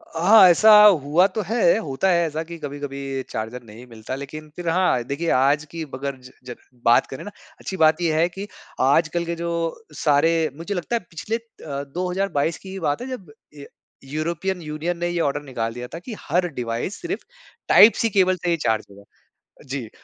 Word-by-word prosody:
हाँ। 190 Hz, +4 st, +7 dB
ऐसा 215 Hz, +5 st, +6 dB
हुआ 170 Hz, -3 st, +5 dB
तो 205 Hz, +3 st, -4 dB
है, 220 Hz, -2 st, +3 dB
होता 160 Hz, -1 st, -1 dB
है 170 Hz, -1 st, +3 dB
ऐसा 155 Hz, +1 st, -4 dB
कि 170 Hz, +1 st, -9 dB
कभी-कभी 140 Hz, -2 st, -5 dB
चार्जर 115 Hz, +3 st, -5 dB
नहीं 115 Hz, +2 st, -13 dB
मिलता 115 Hz, +2 st, -7 dB
लेकिन 150 Hz, +3 st, -8 dB
फ़िर 175 Hz, -1 st, -3 dB
हाँ 165 Hz, -8 st, +2 dB
देखिए, 140 Hz, +7 st, -3 dB
आज 140 Hz, +3 st, +2 dB
की 165 Hz, -1 st, -5 dB
अगर 140 Hz, +1 st, -4 dB
ज 125 Hz, 0 st, -14 dB, 0.2 s
ज 120 Hz, -, -6 dB, 0.3 s
बात 120 Hz, -, +5 dB
करें 135 Hz, -, -8 dB
ना, 205 Hz, -, -8 dB, 0.3 s
अच्छी 190 Hz, -, -6 dB
बात 160 Hz, 0 st, +4 dB
ये 165 Hz, -2 st, +1 dB
है 170 Hz, -, +4 dB
कि 195 Hz, +3 st, -7 dB, 0.3 s
आजकल 160 Hz, +5 st, +2 dB
के 170 Hz, 0 st, -3 dB
जो 170 Hz, +3 st, -3 dB
सारे 150 Hz, +2 st, +3 dB, 0.3 s
मुझे 170 Hz, +5 st, -4 dB
लगता 180 Hz, +6 st, -2 dB
है -, -, +1 dB
पिछले 170 Hz, +7 st, -4 dB
अ, 155 Hz, -11 st, -8 dB
2022 180 Hz, +1 st, -2 dB
की 190 Hz, -, -12 dB
ही 195 Hz, -, -6 dB
बात 145 Hz, 0 st, -1 dB
है 250 Hz, -, -5 dB
जब 205 Hz, -, -8 dB, 0.2 s
य 140 Hz, -1 st, -10 dB, 0.4 s
यूरोपियन 170 Hz, +6 st, -3 dB
यूनियन 155 Hz, +3 st, -4 dB
ने 175 Hz, +1 st, -2 dB
ये 175 Hz, 0 st, -2 dB
ऑर्डर 145 Hz, -1 st, -1 dB
निकाल 115 Hz, -5 st, -4 dB
दिया 125 Hz, +1 st, -7 dB
था 165 Hz, -, -5 dB
कि 220 Hz, +7 st, -8 dB
हर 175 Hz, +4 st, 0 dB
डिवाइस 120 Hz, -, -3 dB
सिर्फ़ 360 Hz, +3 st, -4 dB, 0.5 s
टाइप-सी 230 Hz, +1 st, +6 dB
केबल 185 Hz, -2 st, +3 dB
से 175 Hz, 0 st, -3 dB
ही 170 Hz, -, +2 dB
चार्ज 110 Hz, -7 st, 0 dB
होगा। 100 Hz, 0 st, -15 dB, 0.7 s
जी। 130 Hz, -4 st, -4 dB
160 Hz, 195 wpm, -22 LUFS, 140-180 Hz, 0.7 s, हाँ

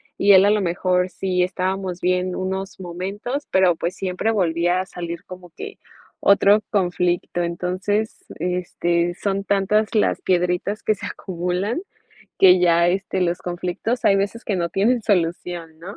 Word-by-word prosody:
y 200 Hz, 0 st, +5 dB
él 190 Hz, +1 st, +7 dB
a 205 Hz, -, +4 dB
lo 210 Hz, -1 st, +2 dB
mejor, 180 Hz, +1 st, 0 dB
sí 185 Hz, 0 st, -1 dB
estábamos 185 Hz, 0 st, -2 dB
bien 180 Hz, 0 st, 0 dB
unos 190 Hz, +1 st, -4 dB
momentos, 195 Hz, -, -5 dB
pero, 185 Hz, -2 st, +4 dB
pues, 170 Hz, +3 st, -3 dB
siempre 185 Hz, +3 st, -2 dB
volvía 175 Hz, -3 st, +1 dB
a -, -, -5 dB
salir 170 Hz, -2 st, -7 dB
como 180 Hz, -1 st, -11 dB
que 420 Hz, -, -9 dB, 0.4 s
otro 200 Hz, +1 st, +5 dB
conflicto. 175 Hz, -2 st, 0 dB
Entonces, 185 Hz, +5 st, -2 dB
este, 175 Hz, 0 st, -1 dB
son 195 Hz, 0 st, -2 dB
tantas 205 Hz, +3 st, +1 dB
las 210 Hz, -, +2 dB
piedritas 180 Hz, +3 st, 0 dB
que 215 Hz, -, +2 dB
se -, -, -7 dB
acumulan 185 Hz, -, -3 dB, 0.6 s
que 185 Hz, -1 st, +7 dB
ya, 170 Hz, -1 st, +4 dB
este, 190 Hz, +1 st, -1 dB
los 175 Hz, -1 st, +1 dB
conflictos 180 Hz, +7 st, -3 dB
hay 195 Hz, -, +5 dB
veces 200 Hz, +4 st, -2 dB
que 200 Hz, -, -1 dB
no 170 Hz, -1 st, -1 dB
tienen 225 Hz, +5 st, +1 dB
solución, 175 Hz, -4 st, -1 dB
¿no? 185 Hz, +5 st, -9 dB
185 Hz, 155 wpm, -22 LUFS, 175-200 Hz, 0.6 s, él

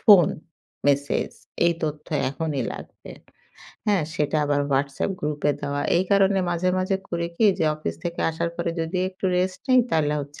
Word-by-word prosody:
Phone, 195 Hz, -7 st, +7 dB, 0.6 s
message 140 Hz, 0 st, +1 dB, 0.4 s
এই 170 Hz, -, +4 dB
তথ্য 150 Hz, -1 st, -3 dB, 0.2 s
এখনই 145 Hz, -3 st, -2 dB
লাগবে। -, -, -10 dB, 0.8 s
হ্যাঁ, 200 Hz, -5 st, +3 dB
সেটা 150 Hz, +1 st, 0 dB
আবার 145 Hz, 0 st, +1 dB
হোয়াটসঅ্যাপ 140 Hz, +6 st, 0 dB
গ্রুপে 150 Hz, 0 st, 0 dB
দেওয়া। 145 Hz, 0 st, -2 dB
এই 180 Hz, -, +2 dB
কারণে 195 Hz, 0 st, +4 dB
মাঝে, 175 Hz, +1 st, 0 dB
মাঝে 190 Hz, +1 st, +1 dB
করি 170 Hz, -1 st, -1 dB
কি 220 Hz, -, +4 dB
যে -, -, +2 dB
অফিস 85 Hz, -, -4 dB
থেকে 170 Hz, 0 st, -3 dB
আসার 170 Hz, +1 st, -2 dB
পরে 170 Hz, -1 st, -1 dB
যদি 165 Hz, +3 st, -2 dB
একটু 190 Hz, +1 st, -10 dB
রেস্ট 185 Hz, 0 st, 0 dB
নেই, 255 Hz, -1 st, +7 dB
তাহলে 150 Hz, -2 st, +2 dB
হচ্ছে 145 Hz, +1 st, -9 dB
160 Hz, 165 wpm, -24 LUFS, 145-185 Hz, 0.8 s, Phone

